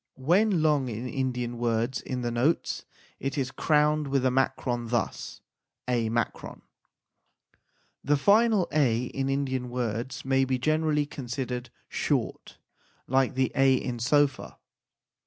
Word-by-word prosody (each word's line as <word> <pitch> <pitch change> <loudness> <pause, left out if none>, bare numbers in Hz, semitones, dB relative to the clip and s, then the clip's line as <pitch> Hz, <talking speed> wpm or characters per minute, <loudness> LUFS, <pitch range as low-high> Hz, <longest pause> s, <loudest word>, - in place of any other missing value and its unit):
When 175 +6 +2
long 145 -5 +2
in 115 +2 -5
Indian 125 -2 -2
words 120 +1 0
in 125 -1 -4
the 120 - -1
notes, 130 +8 0 0.3
it 135 +1 -3
is 130 -2 -1
crowned 150 0 +2
with 135 -1 +1
a 130 - +3
makron, 125 -2 -1
thus 120 -1 -3 0.5
a. 120 -3 +1 1.9
The 145 +1 +2
final 210 +3 +4
a 125 -6 +2
in 135 +2 -3
Indian 130 -2 -1
words 120 +1 -3
may 135 0 +3
be 130 -1 0
generally 155 +2 +1
considered 125 -2 -5 0.2
short, - - -2 0.5
like 130 0 +1
the 130 0 +1
a 135 -1 +4
in 125 -1 -3
sofa. 145 +4 +1
130 Hz, 125 wpm, -27 LUFS, 125-145 Hz, 1.9 s, final